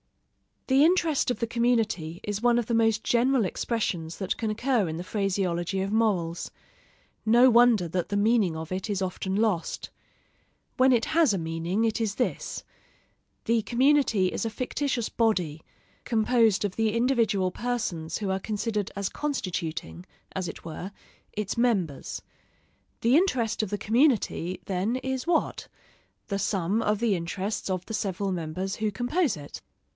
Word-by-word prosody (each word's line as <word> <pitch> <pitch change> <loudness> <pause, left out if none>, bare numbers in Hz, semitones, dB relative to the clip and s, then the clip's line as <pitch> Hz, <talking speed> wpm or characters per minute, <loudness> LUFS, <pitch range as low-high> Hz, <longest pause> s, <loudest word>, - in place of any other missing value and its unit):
The 270 +2 +4
interest 335 -6 +2
of 245 - -1
the 230 - -1
community 225 -9 0
is 205 0 -3
one 240 0 +4
of 240 - +1
the 235 - -2
most 225 -1 +2
general 245 -1 +3
expressions 180 -6 -2
that 190 -2 -2
can 225 - -2
occur 230 -1 +1
in 160 - -4
the 175 - -4
phraseology 190 -2 -1
of 195 +1 -2
morals: 190 -7 0 0.7
no 240 +4 +6
wonder 235 -6 +5
that 180 +1 -2
the 205 - -1
meaning 205 -5 +3
of 160 +1 -6
it 190 +3 -3
is 200 -2 -1
often 190 +1 -2
lost. 205 -6 -1 0.9
When 260 0 +5
it 235 -2 +3
has 315 -8 +3
a - - 0
meaning, 165 +5 -1
it 225 -1 +1
is 210 -2 -1
this: 250 - -2 0.8
The 230 0 +2
community 255 -5 +3
is - - -3
a - - 0
fictitious 255 +1 -2
body, 180 -10 0 0.4
composed 225 -2 +2
of 200 -3 -3
the 220 -1 +1
individual 230 -7 +2
persons 210 -9 -3
who 200 -3 -1
are 190 - 0
considered 210 0 -2
as 200 -1 -2
constituting, 170 - -4 0.3
as 185 -2 -3
it - - -8
were, 170 +4 -6 0.4
its 210 0 -3
members. 195 - 0 0.8
The 240 +5 +5
interest 240 - +1
of 215 - -2
the 205 - -2
community, 220 - +1
then, 195 +5 -1
is 265 +2 -3
what? 340 -2 0 0.6
The 200 -1 -1
sum 195 +2 0
of 210 -2 +1
the 230 -3 +2
interests 190 +4 -3
of 185 -1 -2
the 220 - -7
several 200 -2 -2
members 180 +2 -3
who 215 -1 0
compose 245 - 0
it. 145 -1 -9
210 Hz, 160 wpm, -27 LUFS, 185-235 Hz, 0.9 s, no